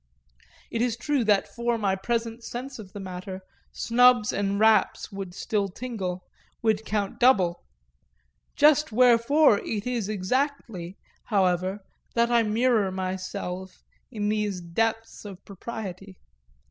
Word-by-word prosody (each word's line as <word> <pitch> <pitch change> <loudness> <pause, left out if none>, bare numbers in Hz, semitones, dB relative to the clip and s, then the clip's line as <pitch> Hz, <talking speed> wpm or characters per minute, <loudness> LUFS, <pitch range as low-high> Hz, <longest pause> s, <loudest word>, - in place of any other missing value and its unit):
It 230 - -1
is 240 -2 0
true 280 +1 0
that 205 -2 +3
for 235 0 -1
my 200 -3 +1
present 230 +3 -3
sense 255 +2 -6
of 195 -3 -10
the 205 - -8
matter 185 0 -7 0.3
snubs 245 -2 +4
and 200 0 -1
raps 220 -2 +3
would 195 -3 -7
still 205 -2 -1
tingle, 190 -5 -5 0.4
would 220 -1 +1
count 205 -2 -2
double; 190 -9 +3 0.9
just 300 -1 +4
wherefore 245 +1 +5
it 210 -2 -4
is 235 -5 -2
exactly, 210 - -2 0.3
however, 190 -1 +1 0.3
that 235 0 +2
I 235 -1 +5
mirror 220 -1 +2
myself 185 0 -5 0.3
in 210 -4 -3
these 210 -3 -1
depths 225 +6 -2
of 200 -3 -10
propriety. 195 -2 -8
210 Hz, 125 wpm, -26 LUFS, 190-235 Hz, 0.9 s, wherefore